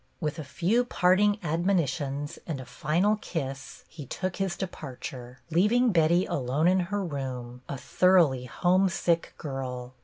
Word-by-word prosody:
With 155 -1 -3
a - - -4
few 185 - +1
parting 205 -2 +3
admonitions 150 -4 -1
and 155 -5 -3
a 130 - -7
final 170 +11 +1
kiss 135 -9 -5
he 150 -5 -10
took 185 +6 -3
his 190 -2 -1
departure, 130 -8 -7
leaving 225 +8 +4
Betty 170 +1 +3
alone 140 +5 0
in 185 +1 +4
her 205 -1 -1
room, 125 -5 -5
a 140 - -3
thoroughly 165 -6 +3
homesick 175 +2 +1
girl. 130 -4 -5
165 Hz, 140 wpm, -28 LUFS, 135-185 Hz, -, leaving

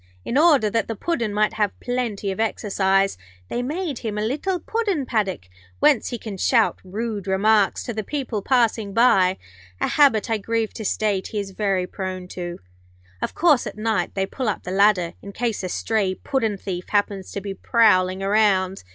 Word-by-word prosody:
In - - -3
order 290 -6 +5
that 225 +1 0
the 225 - -3
Puddin' 235 -4 -1
might 210 +1 +1
have 210 -2 -1
plenty 235 -5 -2
of 190 - -6
exercise, 195 - +1 0.3
they 245 - -2
made 300 +1 -3
him 215 -2 -4
a 210 - 0
little 330 - -1
Puddin' 405 - -1
paddock, 200 - -1 0.3
whence 290 -6 +3
he 240 - -4
can 210 -3 -7
shout 225 +3 +2
rude 205 +1 -4
remarks 200 +1 +2
to 240 - -4
the 215 0 -3
people 250 -4 -3
passing 225 -4 +1
by; 190 -6 +4 0.4
a - - +1
habit, 270 -8 +4
I 225 -2 0
grieve 225 +1 -1
to 220 - -6
state, 200 -2 0
he 215 - -3
is 200 -1 -5
very 195 -2 0
prone 185 -1 -5
to. 175 -1 -5 0.6
Of - - -3
course, 305 -7 +3
at - - -7
night 220 0 -1
they 195 -1 +1
pull 250 +3 -3
up 205 - -3
the 180 - -5
ladder 190 -3 +3
in 200 - -9
case 230 -1 -2
a 185 - -3
stray 200 -1 0
puddin' 225 -6 -1
thief 180 -2 -6
happens 205 -2 -1
to - - -2
be 200 0 -5
prowling 190 -3 +3
around. 195 -2 +2
210 Hz, 185 wpm, -23 LUFS, 195-235 Hz, 0.6 s, order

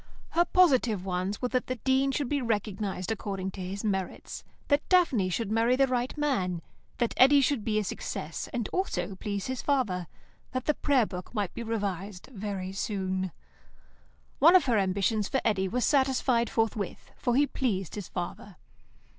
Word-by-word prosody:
Her 345 +1 +3
positive 255 - +3
ones 185 +4 -2
were - - +3
that 255 0 0
the 255 - -1
Dean 265 +2 +2
should 275 0 -1
be 285 +1 0
recognised 205 -4 -2
according 195 -3 -3
to 190 - -8
his 190 +3 -5
merits; 190 -4 -3 0.2
that 285 0 +3
Daphne 275 - +4
should 210 +3 -2
marry 230 +3 +3
the 270 +1 +4
right 255 +1 -1
man; 190 - 0 0.3
that 235 -2 0
Eddy 280 +3 +7
should 270 -4 +1
be 215 -1 0
a 215 - +2
success, 165 -4 -5
and 235 -4 -2
also 195 - -2
please 200 -1 -3
his 260 -1 -3
father; 210 - 0 0.5
that 255 -1 -2
the 300 - +3
Prayer 275 -5 +2
Book 180 +3 -8
might 205 -4 -1
be - - -5
revised 205 -4 -3
very 195 -3 -4
soon. 190 -2 -2 1.1
One 330 +6 +7
of 360 - +6
her 235 -5 +3
ambitions 200 +2 +1
for 265 - 0
Eddy 195 -4 +2
was 245 +6 0
satisfied 260 -4 +2
forthwith, 220 -4 -2
for 245 - 0
he 285 +2 +5
pleased 200 - -2
his 205 -4 -5
father. 180 +2 -6
220 Hz, 170 wpm, -29 LUFS, 190-260 Hz, 1.1 s, Eddy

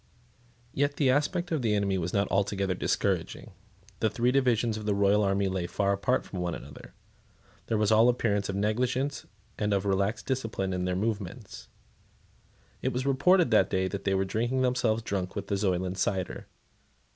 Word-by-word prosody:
Yet 145 +1 0
the 135 -3 +3
aspect 170 +6 0
of 155 -4 0
the 110 -3 +1
enemy 100 -2 0
was 85 0 -2
not 100 0 +1
altogether 100 -1 0
discouraging. - - -2 0.5
The 110 - +2
three 120 +3 +1
divisions 120 -4 +2
of 110 -1 -6
the 105 - +2
royal 100 +1 +3
army 100 0 +1
lay 95 -2 -2
far 100 +2 0
apart 125 +6 0
from 95 - -7
one 90 -1 -2
another. - - -12 0.7
There 110 - 0
was 105 0 +2
all 110 +2 +6
appearance 105 -5 0
of 95 - -2
negligence 125 +7 -1 0.3
and 105 -1 +1
of 100 0 -1
relaxed 100 +3 0
discipline 110 -8 -2
in 90 - -2
all - - -1
their 90 - 0
movements. 100 -2 -4 1.1
It - - 0
was 125 +2 -2
reported 145 +3 +3
that 100 -3 +4
they 95 +1 -1
were 95 0 +1
drinking 120 +6 -1
themselves 120 -3 +1
drunk 95 -4 -3
with - - -5
the 100 - +1
Zoyland 95 -2 -1
cider. 95 -1 -2
105 Hz, 175 wpm, -28 LUFS, 95-125 Hz, 1.1 s, all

